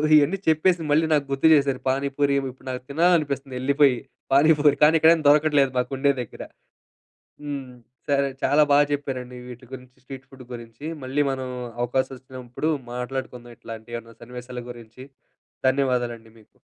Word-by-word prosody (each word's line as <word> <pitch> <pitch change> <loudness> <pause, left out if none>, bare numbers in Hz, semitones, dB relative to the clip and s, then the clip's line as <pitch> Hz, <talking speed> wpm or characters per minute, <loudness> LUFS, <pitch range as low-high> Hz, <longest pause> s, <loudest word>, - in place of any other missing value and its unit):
ఇయన్నీ 150 +6 +4
చెప్పేసి 165 +2 +3
మళ్ళీ 155 +2 +3
నాకు 145 -2 +2
గుర్తు 135 +4 +2
చేశారు. 140 -3 +2
పానీపూరీ 140 +1 0
ఇబ్ 135 - -4
ఇప్పుడు 130 +1 -19
నాకు 125 - -5
తినాలనిపిస్తంది 145 -4 +1
యెళ్ళిపోయి. 140 0 +3 0.4
పానీపూరీ 145 0 +5
కానీ 155 +2 +6
ఇక్కడేం 160 +1 +5
దొరకట్లేదు 145 -2 +4
మాకుండే 135 +3 +1
దగ్గర. - - -9 1.0
హ్మ్. 140 -3 -6 0.3
సరే 140 -1 +2 0.2
చాలా 150 +1 +4
బాగా 145 +1 +5
చెప్పారండి 130 -3 -5
వీటి 125 0 -11
గురించి, 130 0 -11
స్ట్రీట్ 130 0 -10
ఫుడ్డు 135 -1 -13
గురించి. 115 +4 -10 0.2
మళ్ళీ 135 +3 -1
మనం 130 -1 -4 0.3
అవకాశం 130 +2 -1
వచ్చినప్పుడు 130 +3 -5 0.2
మాట్లాడుకుందాం 125 -1 -6
ఇట్లాంటియేవన్నా 115 0 -9
సన్నివేశాల 125 +1 -8
గురించి. 120 +2 -12 0.6
ధన్యవాదాలండి 125 -4 -1
మీకు. 110 - -25
135 Hz, 135 wpm, -24 LUFS, 125-145 Hz, 1.0 s, కానీ